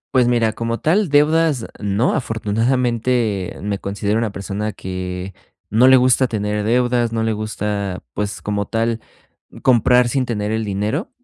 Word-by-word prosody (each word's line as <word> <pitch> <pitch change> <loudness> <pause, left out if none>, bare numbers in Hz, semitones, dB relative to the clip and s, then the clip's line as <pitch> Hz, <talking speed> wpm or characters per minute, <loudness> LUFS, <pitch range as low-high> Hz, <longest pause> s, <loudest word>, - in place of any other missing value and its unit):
Pues 125 -1 +4
mira, 115 -2 +2
como 115 +1 -3
tal 180 +3 +2
deudas, 150 -2 +3
no, 105 +4 0
afortunadamente 115 -2 0
me 100 -1 -3
considero 100 +2 -2
una 115 -2 -1
persona 100 +2 -4
que 90 0 -6 0.4
no 120 +5 +5
le 130 - +8
gusta 130 +1 +4
tener 105 -1 -2
deudas, 120 +1 +1
no 115 0 -1
le 110 0 0
gusta, 105 -3 -3
pues, 105 0 -3
como 100 -1 -2
tal, 115 +1 -1 0.6
comprar 125 0 +4
sin 130 0 0
tener 105 -2 -2
el 110 0 -1
dinero. 105 - -2
110 Hz, 150 wpm, -19 LUFS, 105-125 Hz, 0.6 s, le